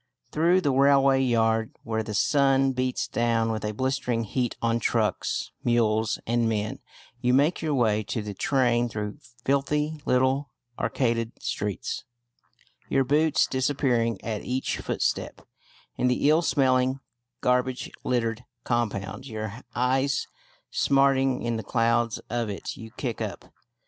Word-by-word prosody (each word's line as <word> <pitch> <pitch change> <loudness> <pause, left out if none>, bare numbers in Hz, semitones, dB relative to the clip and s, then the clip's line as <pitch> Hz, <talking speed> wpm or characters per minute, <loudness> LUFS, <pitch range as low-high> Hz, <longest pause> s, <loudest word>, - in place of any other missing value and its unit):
Through 170 +4 +3
the 145 - +1
railway 135 0 +4
yard, 115 -3 +1
where 110 -1 -1
the 105 -1 -5
sun 135 +3 +3
beats 130 0 -1
down 115 -1 +1
with 110 -2 -3
a 105 - -1
blistering 125 0 -1
heat 120 +3 -2
on 115 0 +1
trucks, - - 0
mules, 110 -2 +2
and 115 0 +1
men, 110 -1 -2 0.4
you 125 0 +3
make 145 +6 +2
your 155 -3 0
way 110 -4 +2
to 110 +1 -3
the 105 -1 -5
train 120 +1 +1
through 105 -1 -5 0.3
filthy 150 +3 0
little 130 +2 +1 0.3
arcaded 115 -2 0
streets, 105 -5 -3 0.9
your 135 - +3
boots 150 +4 +3
disappearing 130 -5 0
at 110 -3 -3
each 130 +1 -2
footstep - - -2 0.5
in 125 - +2
the 125 +3 +2
ill 160 +2 +4
smelling, 130 -4 +2 0.4
garbage 125 0 0
littered 115 -2 -1 0.2
compound, 120 0 -2
your 110 -3 -5 0.2
eyes 130 +3 +1 0.5
smarting 135 -1 +2
in 120 -1 -1
the 110 - -5
clouds 115 +1 +1
of 120 -2 -2
it 100 - -5
you 115 - -9
kick 120 -5 -3
up. - - -6
125 Hz, 135 wpm, -26 LUFS, 115-135 Hz, 0.9 s, railway